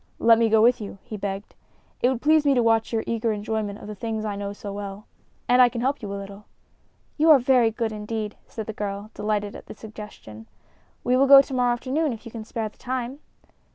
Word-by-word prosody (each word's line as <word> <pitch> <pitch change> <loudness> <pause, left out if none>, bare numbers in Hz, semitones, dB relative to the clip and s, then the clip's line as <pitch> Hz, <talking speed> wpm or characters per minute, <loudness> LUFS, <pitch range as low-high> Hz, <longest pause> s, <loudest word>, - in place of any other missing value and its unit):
"Let 230 0 +5
me 230 -1 +3
go 220 0 +4
with 245 0 +4
you," 200 -1 -7
he 235 -3 -7
begged. 200 0 -5 0.5
"It 250 - +4
would 255 -2 -3
please 310 0 +5
me 280 -2 +3
to 245 - +3
watch 225 -1 +2
your 225 -1 0
eager 230 0 -1
enjoyment 210 -1 -3
of - - -11
the 210 - -6
things 220 +1 -4
I 205 -1 -2
know 200 0 -4
so 205 0 -7
well. 200 0 -7 0.4
And 250 +1 +5
I 250 - +7
can 235 -1 -5
help 270 +2 0
you 205 -2 -5
a 200 - -4
little." 200 +1 -9 0.7
"You 315 +2 +4
are 305 - +9
very 250 -2 +3
good, 225 0 -2
indeed," 210 0 -4
said 220 - -6
the 220 - -5
girl, 205 0 -5
delighted 210 -1 -2
at - - -11
the - - -9
suggestion. 210 - -11 0.6
"We 250 - +2
will 275 +1 +4
go 275 0 +10
to 270 - -9
morrow 245 -1 +2
afternoon, 270 +4 -1
if 225 - -11
you 230 - -9
can 220 -1 -7
spare 225 0 -3
the - - -30
time." 255 +1 -4
225 Hz, 235 wpm, -24 LUFS, 210-245 Hz, 0.7 s, go